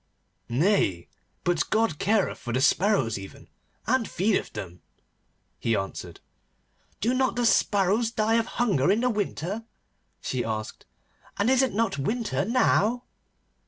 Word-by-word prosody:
'Nay, 120 - +1 0.4
but 175 -2 0
God 215 -9 +1
careth 210 0 +1
for 120 - -6
the 130 - +1
sparrows 135 - +2
even, 95 - -11 0.4
and 230 -2 +1
feedeth 200 +4 0
them,' 90 -1 -7 0.8
he 115 -1 +1
answered. 95 -1 -5 0.8
'Do 235 +4 +1
not 260 0 +1
the 245 -1 0
sparrows 205 +1 +2
die 225 0 +1
of 230 - -2
hunger 195 - +2
in 210 +4 +3
the 250 0 +2
winter?' 205 0 -3 0.6
she 130 -2 -2
asked. 110 -1 -5 0.5
'And 210 +5 +2
is 265 0 +4
it 260 -7 0
not 225 -10 0
winter 215 - -1
now? 240 0 +2
205 Hz, 135 wpm, -26 LUFS, -, 0.8 s, is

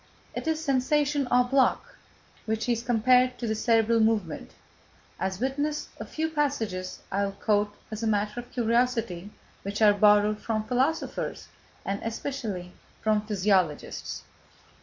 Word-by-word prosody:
It - - -5
is 320 -1 +1
sensation 285 -1 +1
en 250 0 +5
bloc 270 +1 +2 0.5
which 220 +2 -1
is 235 -2 +1
compared 250 +2 +3
to 240 - -4
the 220 - 0
cerebral 225 +1 +3
movement, 220 -7 0 0.7
as 190 0 -2
witness 285 +4 -1
a - - -6
few 320 0 -2
passages 230 -12 -2
I 200 +1 +1
will 195 - -4
quote 205 0 0 0.2
as 215 0 -5
a 225 - 0
matter 210 +1 0
of 245 - -10
curiosity, 230 -6 0 0.3
which 200 +1 -4
are 210 -2 +6
borrowed 210 +1 +4
from 220 -2 -1
philosophers 260 +7 -1 0.4
and, 200 +1 -2
especially, 225 -6 -4 0.3
from 215 -1 +1
physiologists. 190 -7 0
225 Hz, 140 wpm, -27 LUFS, 205-255 Hz, 0.7 s, are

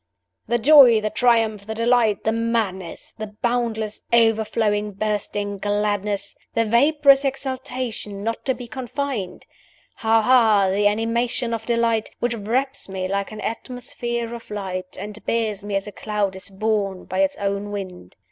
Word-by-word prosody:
"'The 240 +1 +2
joy, 250 -3 +7
the 215 0 -2
triumph, 225 -4 +2
the 220 - -4
delight, 230 -2 +2
the 220 - +2
madness! 225 -6 -2
the 215 - -4 0.2
boundless, 230 -3 -1
overflowing, 220 -2 +2
bursting 205 0 -2
gladness! 205 0 -1 0.2
the 230 0 +2
vaporous 275 +4 +5
exultation 255 -6 -4
not 230 +1 -3
to 260 -2 0
be 245 0 -8
confined! 250 -3 -4 0.5
Ha! 225 0 +3
ha! 220 -6 +5
the 205 +2 +3
animation 230 +3 0
of 225 -1 -4
delight, 230 -2 +1
which 240 0 -1
wraps 245 +4 -1
me 190 -1 -3
like 200 +2 -2
an 215 -1 -7
atmosphere 235 0 -4
of 235 -1 -9
light, 185 -3 -5
and 210 +2 -8
bears 215 -3 -1
me 205 -1 -3
as 195 - -1
a 210 - -7
cloud 205 -2 -2
is 190 +1 -8
borne 200 -2 -1
by 185 - -3
its 195 0 +2
own 200 +1 -2
wind. 185 - -7
220 Hz, 150 wpm, -22 LUFS, 205-235 Hz, 0.5 s, joy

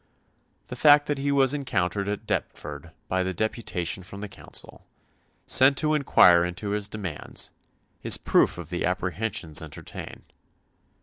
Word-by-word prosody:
The - - -6
fact 145 +2 +6
that 145 -2 -2
he 140 +1 0
was 135 -1 +4
encountered 100 -8 -1
at 105 - -4
Deptford - - -4 0.2
by 95 0 0
a 95 0 -2
deputation 95 -4 -2
from 100 +2 -10
the 105 - -5
Council, - - -8 0.6
sent 135 +1 +5
to 155 +1 +1
inquire 90 - +5
into 90 +4 -4
his 105 0 -1
demands, 95 -9 -5 0.5
is - - +3
proof - - +2
of 85 -3 -9
the 90 - -2
apprehensions 90 -2 0
entertained. 80 -2 -10
100 Hz, 140 wpm, -25 LUFS, 90-135 Hz, 0.6 s, fact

